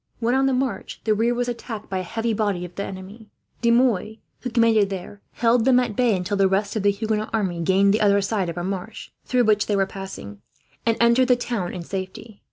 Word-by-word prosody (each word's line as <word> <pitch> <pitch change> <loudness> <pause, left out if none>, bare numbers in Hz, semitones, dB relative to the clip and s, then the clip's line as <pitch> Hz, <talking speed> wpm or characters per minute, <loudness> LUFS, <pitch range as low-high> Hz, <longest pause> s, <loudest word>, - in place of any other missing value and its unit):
When 235 +1 +1
on 270 +1 +3
the 270 - +1
march, 260 0 -2
the 215 - +2
rear 230 +3 +1
was 245 0 -1
attacked 235 -2 -6
by 190 - -2
a - - -2
heavy 225 +5 -2
body 205 -4 -1
of 175 - -11
the 200 - -4
enemy. 195 +4 -9 0.3
De 235 - +2
Mouy, 235 -3 +2 0.2
who 250 - -4
commanded 230 -4 +3
there, 195 +1 -7
held 235 0 +2
them 255 0 +5
at 235 -4 -2
bay 240 -3 +3
until 185 +3 -2
the 195 -1 +4
rest 200 +2 0
of 215 - 0
the 205 - +3
Huguenot 215 +1 -1
army 190 -6 -1
gained 195 +3 +3
the 215 - +1
other 200 -1 +4
side 195 -2 -1
of 170 - -6
a 175 - -3
marsh, 195 +4 -5
through 250 -1 +2
which 215 -2 +2
they 210 - +1
were 195 -1 +2
passing, 190 - -9 0.5
and 230 - +2
entered 235 +2 +4
the 250 - +5
town 235 -7 -3
in 180 - -6
safety. 195 +4 -7
215 Hz, 235 wpm, -23 LUFS, 195-235 Hz, 0.5 s, them